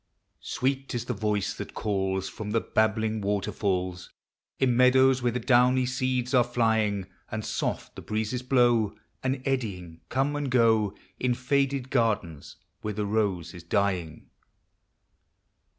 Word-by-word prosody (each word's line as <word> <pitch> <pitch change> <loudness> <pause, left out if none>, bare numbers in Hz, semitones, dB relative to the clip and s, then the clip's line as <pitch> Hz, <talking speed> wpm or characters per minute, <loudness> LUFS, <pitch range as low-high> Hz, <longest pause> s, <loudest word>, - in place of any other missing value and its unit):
Sweet 135 0 -2
is 120 0 -2
the 125 - -2
voice 105 -2 -1
that - - -8
calls 95 -2 -1
From 110 -2 -6
the 115 +2 +2
babbling 110 0 0
waterfalls 95 -3 -2 0.5
In 125 -3 +2
meadows 130 +1 +5
where 120 0 +1
the 125 - -2
downy 125 +1 +4
seeds 130 0 -1
are 125 -2 +6
Hying; 110 -5 +1 0.2
And 110 -1 -4
soft - - -3
the - - -8
breezes 110 +3 -2
blow. 120 -5 +3 0.3
And 130 0 -2
eddying 95 -11 -3
come 135 +3 0
and 145 -2 -2
go 115 -5 +3 0.2
In 125 -1 +1
faded 135 0 0
gardens 105 - -1 0.3
where 105 -1 -4
the 105 0 -1
rose 100 -5 -1
is 90 - -9
dying. 85 -3 -1
110 Hz, 135 wpm, -27 LUFS, 100-125 Hz, 0.5 s, are